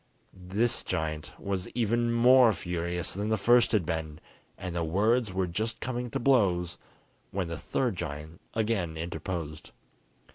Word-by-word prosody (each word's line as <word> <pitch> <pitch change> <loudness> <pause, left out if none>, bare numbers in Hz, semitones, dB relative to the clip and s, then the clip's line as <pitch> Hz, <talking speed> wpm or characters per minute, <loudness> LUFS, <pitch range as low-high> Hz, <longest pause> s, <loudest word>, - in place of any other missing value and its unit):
This 100 +6 0
giant 80 -4 -3
was 95 -2 -3
even 120 0 +1
more 120 0 +6
furious 85 -1 -2
than 105 +3 -2
the 110 - +2
first 120 +4 +4
had 105 -7 +2
been, 80 -2 -3 0.4
and 90 -2 -5 0.2
words 110 +4 +2
were 95 0 0
just 110 +6 -2
coming 125 -1 -3
to - - -2
blows, 90 -10 +2 0.5
when 95 -3 -2
the 85 - -4
third 120 -8 -1
giant 75 +2 -6
again 105 -8 0
interposed. 80 -1 -5
95 Hz, 140 wpm, -29 LUFS, 85-115 Hz, 0.5 s, more